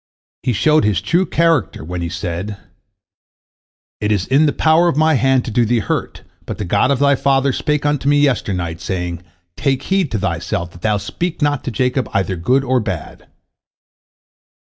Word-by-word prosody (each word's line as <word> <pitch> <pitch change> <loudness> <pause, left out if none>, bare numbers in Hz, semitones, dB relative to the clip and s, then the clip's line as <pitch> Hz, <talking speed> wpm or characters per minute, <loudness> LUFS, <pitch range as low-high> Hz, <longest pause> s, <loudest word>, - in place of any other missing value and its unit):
He 125 - 0
showed 150 +6 +3
his 105 -4 +2
true 170 - +1
character 165 - +1
when 90 +2 -5
he 85 - -3
said, 90 +3 -4 1.4
"It 105 0 -1
is 100 -3 +1
in 145 +4 +3
the - - +2
power 160 +4 +3
of 160 - 0
my 155 +1 +4
hand 130 -1 +2
to 120 - -4
do 120 +2 +2
thee 120 +2 +1
hurt, 110 - -3 0.2
but - - -5
the 105 - -4
God 100 +7 +2
of 140 - +2
thy 140 +1 +3
father 135 0 +2
spake 150 +1 -1
unto 145 -1 +1
me 145 - +4
yesternight, 90 - 0
saying, 90 0 -3 0.3
Take 135 -2 0
heed 190 -5 0
to - - +1
thyself 85 -2 -3
that 85 - -15
thou 105 -1 +1
speak 170 - -4
not 145 -2 +1
to - - -1
Jacob 125 +3 0
either 95 -1 0
good 125 +11 +1
or 130 -1 +1
bad." 95 -8 -6
125 Hz, 185 wpm, -18 LUFS, 95-145 Hz, 1.4 s, my